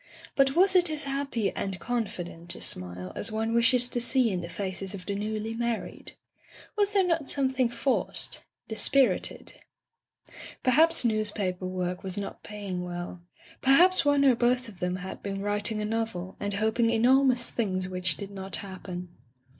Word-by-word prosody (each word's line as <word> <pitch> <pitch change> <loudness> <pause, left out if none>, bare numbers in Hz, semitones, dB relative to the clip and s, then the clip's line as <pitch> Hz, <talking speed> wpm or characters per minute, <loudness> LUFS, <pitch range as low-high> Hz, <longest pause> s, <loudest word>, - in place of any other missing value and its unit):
But 270 -1 +3
was 380 +2 +5
it 355 -2 +5
as 310 -1 -1
happy 275 -6 -1
and 190 -2 -4
con 240 +3 -1
fident 175 -2 -5
a - - -10
smile 90 0 -2
as 220 - 0
one 220 +1 -1
wishes 235 +1 +5
to 240 - -2
see 245 -1 +3
in 180 -2 -2
the 170 - -7
faces 190 +1 -4
of 180 -2 -9
the 200 - -2
newly 215 +2 -3
married? 235 -1 -3 0.6
Was 410 -1 +1
there 390 -2 +4
not 330 -5 0
something 260 -3 +1
forced 260 +2 0
— - - -60
dispirited? 255 +4 +2 1.1
Perhaps 315 +3 +4
newspaper 205 -5 -1
work 180 -1 -3
was 190 -1 -4
not 200 - -5
paying 200 -4 -5
well; 175 0 -6 0.4
perhaps 350 +8 +5
one 285 -1 +3
or 265 - +7
both 245 +1 +1
of 200 -5 -12
them 180 0 -1
had 185 +1 -7
been 195 0 -4
writing 205 +1 -1
a - - -1
novel, 215 -5 -3
and 205 0 -3
hoping 220 +2 +2
enormous 245 +2 +3
things 185 -5 -1
which 180 -2 -1
did 200 0 -7
not 195 -1 -3
happen. 185 -2 -7
220 Hz, 170 wpm, -28 LUFS, 185-255 Hz, 1.1 s, or